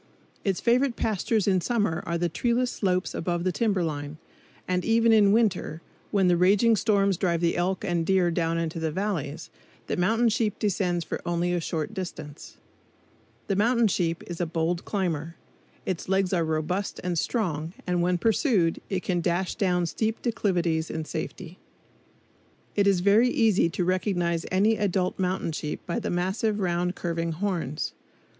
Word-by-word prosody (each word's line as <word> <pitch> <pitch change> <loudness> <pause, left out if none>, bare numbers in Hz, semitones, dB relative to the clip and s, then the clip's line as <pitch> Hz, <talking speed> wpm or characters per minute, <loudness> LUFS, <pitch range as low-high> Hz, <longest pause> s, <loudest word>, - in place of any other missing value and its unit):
Its 195 -3 0
favorite 245 +1 +2
pastures 215 0 0
in 190 -2 +3
summer 205 -7 0
are 170 - 0
the 175 +1 0
treeless 240 +8 0
slopes 185 -2 -1
above 175 0 -2
the 185 - +1
timber 200 -3 +1
line; 145 -1 -4 0.5
and 180 0 0
even 230 0 +3
in 205 -2 +6
winter, 205 -7 +1 0.3
when 195 -3 +2
the 175 - +4
raging 200 +6 +4
storms 200 -3 +2
drive 170 -2 +1
the 170 0 +1
elk 185 +3 -1
and 175 -3 0
deer 180 -1 +2
down 165 -1 0
into 165 0 -2
the 160 -1 -1
valleys, 165 -5 -3 0.3
the - - -2
mountain 225 +7 +2
sheep 220 -2 0
descends 180 -4 0
for - - -4
only 175 +1 0
a 175 - 0
short 160 +4 -3
distance. 175 -6 -7 0.9
The 195 - -1
mountain 235 +3 +3
sheep 170 -3 -1
is 175 0 -5
a 175 - 0
bold 165 +2 -1
climber. 170 -5 -2 0.5
Its 185 -1 -3
legs 190 -1 +1
are 170 -2 +2
robust 160 +5 -2
and 180 -1 -1
strong, 165 -4 -1
and 180 -1 0
when 180 +1 +2
pursued 210 - +2
it 190 -2 -2
can 175 -2 0
dash 175 +2 0
down 180 -5 +1
steep 220 +6 -2
declivities 175 -8 0
in 160 -1 -4
safety. 170 +3 -6 1.2
It 200 -1 +3
is 190 -3 +3
very 210 +6 +5
easy 220 -8 +3
to 175 +2 -2
recognize 175 -2 0
any 210 +4 +3
adult 190 -3 0
mountain 185 -2 -1
sheep 150 -1 -4
by 170 - -2
the - - -3
massive 195 +5 0
round 180 -1 0
curving 165 -1 -2
horns. 170 -5 -2
180 Hz, 165 wpm, -26 LUFS, 170-205 Hz, 1.2 s, in